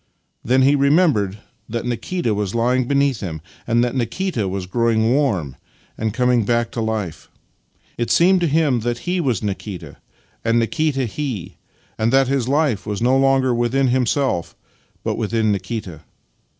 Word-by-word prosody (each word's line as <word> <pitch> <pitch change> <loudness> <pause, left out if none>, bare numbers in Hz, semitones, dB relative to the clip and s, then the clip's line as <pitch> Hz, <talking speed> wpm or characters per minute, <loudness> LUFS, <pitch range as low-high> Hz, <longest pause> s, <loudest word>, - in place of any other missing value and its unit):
Then 130 +2 +3
he 140 +2 +5
remembered 140 - +2 0.3
that 115 +1 -3
Nikita 120 +2 -2
was 105 0 -2
lying 125 +2 +1
beneath 140 -3 +2
him, 85 -6 -5 0.3
and 120 +1 +3
that 120 - -1
Nikita 125 - -1
was 95 0 -3
growing 115 +3 +1
warm 100 - 0 0.4
and 110 - -2
was 105 - -8
coming 125 -2 +3
back 120 +2 0
to 115 - -3
life. 110 -7 -3 0.7
It 120 -1 -1
seemed 180 +5 +4
to 170 - +2
him 150 -4 +2
that 120 +1 -2
he 180 0 +1
was 125 - -1
Nikita, 100 -2 -5 0.5
and 115 +1 +2
Nikita 140 +2 0
he, 120 - -5 0.4
and 110 +1 +2
that 135 0 +4
his 135 -3 0
life 140 -7 +1
was 105 -2 -2
no 125 +3 +3
longer 135 -1 +3
within 120 +3 +1
himself, 125 - 0 0.5
but - - -2
within 110 -1 0
Nikita. 95 -4 -4
120 Hz, 160 wpm, -20 LUFS, 110-135 Hz, 0.7 s, he